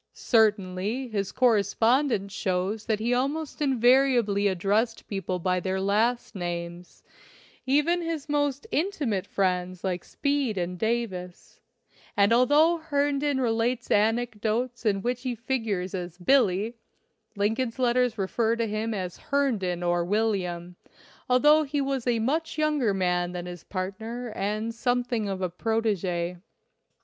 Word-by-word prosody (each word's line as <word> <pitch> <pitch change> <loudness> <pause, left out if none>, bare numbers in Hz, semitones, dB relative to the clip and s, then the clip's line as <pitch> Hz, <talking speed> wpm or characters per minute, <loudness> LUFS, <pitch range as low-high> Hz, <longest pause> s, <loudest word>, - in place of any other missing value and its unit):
Cer 220 -3 +4
tainly 205 +6 -4
his 200 -2 -2
correspondence 230 -1 +2
shows 195 +2 -2
that 220 -2 +1
he 235 +3 0
almost 285 +5 -2
invariably 245 -6 +3
addressed 205 +5 0
people 195 -2 -3
by 180 +1 0
their 190 +1 -2
last 220 +5 +1
names 175 -2 -6 0.3
— - - -24 0.3
even 300 +6 +2
his 330 -3 -4
most 290 +1 0
intimate 285 - -1
friends 185 -1 -1
like 180 -2 -2
Speed 280 -7 -1
and 180 0 -3
Davis; 215 -6 -3 0.6
and 200 +2 +5
although 295 +8 +4
Herndon 290 -2 0
relates 240 0 0
anecdotes 225 +2 0
in 195 -2 +1
which 245 0 -1
he 255 -2 -3
figures 225 -6 -2
as 175 -2 -5
"Billie," 215 0 +2 0.6
Lincoln's 225 +5 -1
letters 250 -1 +2
refer 220 +4 0
to 230 0 -1
him 215 +1 -2
as 180 -3 -4
Herndon 215 -12 -1
or 175 0 +1
William, 180 -3 -1 0.5
although 295 +5 +5
he 290 -1 -2
was 270 -3 -2
a 240 -1 +2
much 305 +10 -1
younger 300 -7 +2
man 180 -1 0
than 175 -1 -5
his 175 -2 -8
partner 220 +6 -5
and 215 +3 -2
something 245 -2 -1
of 190 -1 -3
a 180 - 0
protege. 185 -4 -1
225 Hz, 135 wpm, -26 LUFS, 190-255 Hz, 0.6 s, and